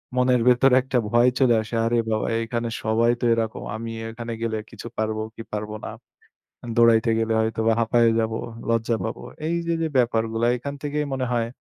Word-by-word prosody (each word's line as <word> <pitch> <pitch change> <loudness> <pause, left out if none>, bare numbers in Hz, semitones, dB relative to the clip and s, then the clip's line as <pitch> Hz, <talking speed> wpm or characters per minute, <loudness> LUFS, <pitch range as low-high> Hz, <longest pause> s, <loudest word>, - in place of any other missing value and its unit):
মনের 125 -1 +3
ভেতরে 125 +1 +5
একটা 130 -1 -1
ভয় 120 +1 +5
চলে 120 -3 +4
আসে। 110 +2 -6
"আরে 120 +1 +1
বাবা! 110 0 0 0.2
এখানে 115 0 -3
সবাই 115 +2 +3
তো 120 - -1
এরকম। 115 -1 -2
আমিএ 115 0 -6
এখানে 115 0 -7
গেলে 110 -1 -1
কিছু - - -9
পারবো 110 0 -1
কি - - -8
পারবো 105 0 -4
না। - - -4 0.9
দৌড়াইতে 115 -1 +5
গেলে 115 0 0
হয়তোবা 110 0 +1
হাঁপায়ে 115 0 +3
যাবো, 110 0 -1 0.3
লজ্জা 115 0 +1
পাবো।" 110 - -4 0.3
এইযে 170 0 -1
যে 160 - +1
ব্যাপারগুলা 115 -1 +1
এখান 140 +3 -5
থেকেই 150 0 -1
মনে 130 -1 -1
হয়। 115 -1 0
115 Hz, 175 wpm, -24 LUFS, 110-125 Hz, 0.9 s, ভেতরে